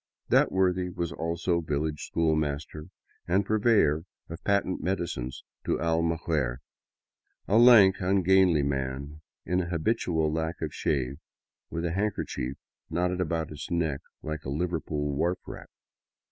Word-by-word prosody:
That - - +4
worthy 90 -1 +1
was 85 -2 -3
also 85 +1 -1
village 75 -1 -2
schoolmaster 75 -1 -1 0.4
and 95 +3 +2
purveyor 105 -8 +3 0.2
of 85 +1 -8
patent 100 -2 +1
medicines 85 -9 -3 0.2
to - - 0
Almaguer; 80 -6 0 0.9
a 110 +3 +4
lank, 110 -6 +8
ungainly 95 -4 +4
man 70 +2 -3 0.2
in 90 +2 +1
an 85 - -4
habitual 85 -3 0
lack 80 +1 -2
of 80 -2 -4
shave, 65 -1 -1 0.5
with 85 +1 -3
a 85 - 0
handkerchief 90 -9 -2 0.3
knotted 90 +2 0
about 80 -2 -2
his 75 -1 -7
neck 80 -5 0 0.2
like 75 -1 -4
a - - -5
Liverpool 75 -1 -2
wharf 85 +6 0
rat. - - -9
85 Hz, 130 wpm, -28 LUFS, 75-90 Hz, 0.9 s, lank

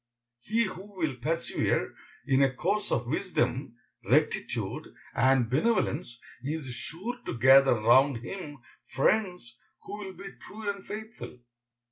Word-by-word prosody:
He 225 - +1
who 195 0 -7
will 160 -7 -1
persevere 165 +7 -1 0.3
in 135 -1 +3
a 135 -1 +4
course 200 +11 -1
of 120 - +1
wisdom, 135 -4 -1 0.3
rectitude, - - 0 0.3
and 130 -2 +3
benevolence, 140 - 0 0.2
is 145 -2 -4
sure 190 - -6
to - - -3
gather 135 +2 +7
round 130 +4 +5
him 150 -3 -7 0.3
friends 180 - 0 0.2
who 205 - -7
will 190 -2 -7
be 195 +1 -9
true 215 0 -9
and 200 -1 -3
faithful. 220 - -8
155 Hz, 125 wpm, -29 LUFS, 130-200 Hz, 0.3 s, gather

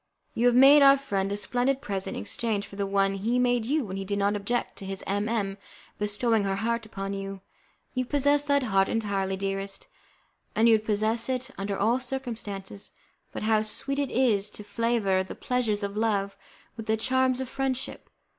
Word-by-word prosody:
You 240 +2 +2
have 245 - +4
made 275 +3 +8
our 275 0 +8
friend 200 -8 -2
a 200 - -1
splendid 250 +5 0
present 195 -7 -4
in - - -3
exchange 215 - -2
for 200 - -12
the 200 0 -2
one 195 0 +2
he 220 +5 0
made 245 -2 +2
you 290 0 +1
when 190 -1 -5
he 195 - -3
did 200 +1 -2
not 200 +1 +1
object 205 +4 -2
to 195 - -8
his 195 0 -5
M 205 +2 -1
M 200 -3 -1 0.4
bestowing 210 +1 +1
her 195 -1 0
heart 230 +2 -1
upon 195 -1 -5
you. 195 -1 -5 0.5
You 255 -1 -1
possess 285 +2 +3
that 285 -1 +2
heart 195 -5 +2
entirely, 195 -3 -1
dearest, 195 0 -4 0.7
and 225 +2 +4
you 230 - +7
would 215 -1 +2
possess 220 +3 0
it 255 0 -2
under 195 0 -3
all 230 +5 +2
circumstances, 225 -7 -5 0.4
but - - -5
how 215 0 +3
sweet 275 +6 -2
it 280 -2 0
is 220 -5 +2
to 210 - -9
flavour 205 -2 +1
the 190 - -7
pleasures 225 -5 -1
of 200 0 -3
love 205 -3 0 0.4
with 225 -1 -8
the 220 0 +2
charms 260 +2 +1
of 260 - -3
friendship! 265 0 -3
215 Hz, 195 wpm, -27 LUFS, 200-245 Hz, 0.7 s, made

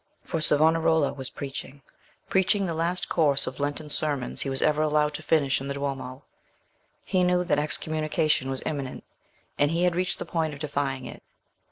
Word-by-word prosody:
For 165 - -3
Savonarola 160 0 +4
was 135 -2 -4
preaching—preaching 145 +9 -3
the 170 - -2
last 170 +3 0
course 145 -5 +2
of 130 +1 -6
Lenten 145 +2 -3
sermons 145 -5 0
he 135 - -1
was 135 0 +2
ever 150 0 +2
allowed 150 -1 +2
to 155 - -5
finish 145 -4 +1
in 135 - -5
the 140 - -3
Duomo: 135 -1 -5 0.8
he 185 -1 +1
knew 180 0 +2
that 145 - +1
excommunication 155 -1 0
was 135 -1 -3
imminent, 140 -4 -4 0.6
and 145 - +4
he 170 +2 0
had 180 -1 +2
reached 180 0 0
the - - -5
point 160 -2 -1
of - - -12
defying 140 -3 -2
it. - - -9
150 Hz, 175 wpm, -26 LUFS, 140-160 Hz, 0.8 s, Savonarola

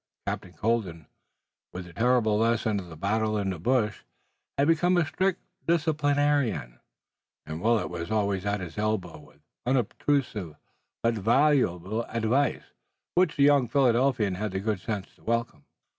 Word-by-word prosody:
Captain 90 - -4
Colden, 95 -9 -1 0.7
with 90 0 -7
the 85 - -13
terrible 115 -1 +2
lesson 110 -2 +1
of 90 - -8
the 80 - -9
battle 110 +4 0
in 100 -2 -1
the 90 - -6
bush, 110 +2 +1 0.6
had 140 +1 +3
become 175 +2 +3
a 175 - +3
strict 185 +4 0 0.3
disciplinarian, 145 - +1 0.7
and 80 +2 -6
Willet 115 +1 +2
was 85 -1 -5
always 100 -3 0
at 100 -1 -1
his 90 +2 -7
elbow 105 -7 -2
with 75 - -19 0.2
unobtrusive 125 - 0 0.5
but 115 0 +3
valuable 115 - +2
advice 115 +4 0 0.5
which 180 -3 +2
the 140 - +3
young 140 -3 +5
Philadelphian 120 -4 +2
had 100 +1 -3
the 95 - -1
good 105 -1 -1
sense 100 0 -3
to - - -25
welcome. 115 +1 -2
110 Hz, 145 wpm, -27 LUFS, 95-135 Hz, 0.7 s, young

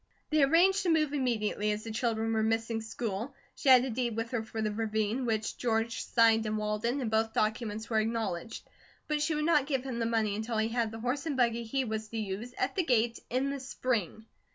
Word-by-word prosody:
They 305 -1 +4
arranged 350 +8 +5
to 370 - 0
move 305 -3 +2
immediately, 225 -6 0
as 210 +1 -3
the 225 - -6
children 225 0 0
were 220 - +2
missing 225 +1 0
school. 225 +3 -4 0.2
She 275 - -1
had 255 -1 +8
a 260 - -3
deed 235 -1 -1
with 225 +2 -3
her 240 -3 0
for 220 0 -7
the 215 -1 0
ravine, 220 +3 -1
which 220 -1 -1
George 230 -1 0
signed 225 -1 +4
in 215 0 -1
Walden, 215 +5 -1
and 230 -4 -2
both 220 0 +1
documents 220 0 -1
were 220 -2 +1
acknowledged; 225 -3 -3 0.4
but 300 -1 0
she 310 +1 +1
would 300 0 0
not 300 -4 +3
give 270 -4 0
him 255 -3 -4
the 230 - 0
money 220 -3 +1
until 220 +2 -3
he 220 +1 +1
had 230 -1 0
the 225 - -7
horse 265 +6 -2
and 285 -4 -2
buggy 235 -2 +2
he 260 +4 -1
was 220 -1 -3
to 225 - -6
use, 215 +4 -4
at 260 - 0
the 370 - +2
gate, 235 -5 +1
in 260 +3 0
the 280 - -4
spring. 235 -6 -2
230 Hz, 225 wpm, -30 LUFS, 220-260 Hz, 0.4 s, had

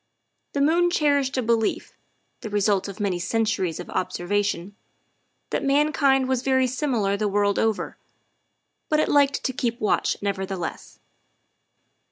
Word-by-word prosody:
The 280 - 0
moon 340 +4 +3
cherished 285 -5 +1
a 255 - +1
belief, 225 -1 0 0.4
the 220 - -6
result 205 -1 +1
of 200 +2 -8
many 195 -4 -1
centuries 200 -3 -1
of 175 - -7
observation, 200 +1 -2 0.8
that - - -1
mankind 275 -1 +3
was 260 -2 0
very 260 0 +2
similar 245 -6 0
the 210 +1 -1
world 205 0 +1
over, 220 -2 -1 0.9
but 305 - +2
it - - +1
liked 285 -1 +3
to 260 - -1
keep 240 -3 -2
watch, 215 - +1
nevertheless. 190 -3 -4
225 Hz, 135 wpm, -24 LUFS, 200-275 Hz, 0.9 s, moon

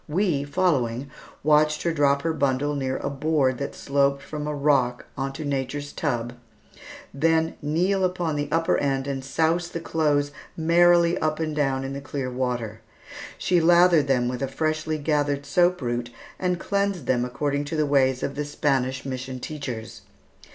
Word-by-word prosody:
We, 165 -3 +1
following, 140 -5 0 0.3
watched 150 0 +3
her 170 - +1
drop 140 -2 +2
her 165 -1 0
bundle 140 0 0
near 135 -2 -2
a - - -3
board 140 -3 +1
that 140 - -4
sloped 140 0 +1
from 150 +1 -5
a 150 - -2
rock 140 -4 +1
into 135 +3 -4
nature's 145 +1 -3
tub, 120 -5 -2 0.8
then 160 +3 +2
kneel 180 +6 +1
upon 180 -4 0
the 145 0 -2
upper 165 +2 +2
end 135 -1 0
and 135 -1 -3
souse 160 +5 +1
the 170 - -4
clothes 150 -3 0 0.3
merrily 170 +1 +4
up 155 0 -1
and 155 -2 -2
down 135 -3 0
in 135 +1 -4
the 140 - -5
clear 140 -2 -4
water. 120 -4 -3 0.6
She 180 -2 +2
lathered 170 -3 +5
them 125 -3 +2
with 125 +1 -3
a 135 - 0
freshly 155 +2 -1
gathered 145 -1 0
soap 180 -2 +2
root 120 0 -2 0.3
and 180 -1 0
cleansed 200 -7 -1
them 125 -2 +1
according 145 +3 -2
to 145 - -4
the 155 -1 +2
ways 130 -2 +2
of 140 - -2
the 145 +1 -3
Spanish 135 -3 -1
mission 130 -1 -5
teachers. 125 -6 -6
145 Hz, 165 wpm, -25 LUFS, 135-160 Hz, 0.8 s, lathered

